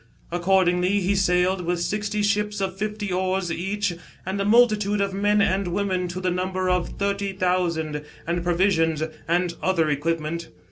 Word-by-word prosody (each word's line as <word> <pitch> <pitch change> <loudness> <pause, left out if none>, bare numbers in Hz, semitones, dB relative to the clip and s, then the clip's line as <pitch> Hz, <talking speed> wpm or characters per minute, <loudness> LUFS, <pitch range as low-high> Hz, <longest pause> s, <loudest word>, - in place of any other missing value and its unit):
Accordingly 180 +2 +2
he 195 +1 +1
sailed, 185 0 +2
with 175 0 -1
sixty 210 +3 -1
ships 210 0 0
of 190 -1 -2
fifty 210 0 -3
oars 185 -1 0
each, 195 +3 -1 0.3
and 190 +2 -2
a - - 0
multitude 210 -2 +4
of 200 -1 0
men 205 +1 +3
and 190 0 +1
women 185 0 -1
to 175 +1 -5
the 185 -1 0
number 185 +1 -1
of 180 -1 0
thirty 200 0 -1
thousand, 170 -5 0 0.2
and 170 +1 -1
provisions 170 -3 +2 0.2
and 175 +1 +1
other 165 -5 +2
equipment. 165 +2 -2
185 Hz, 155 wpm, -24 LUFS, 175-200 Hz, 0.3 s, multitude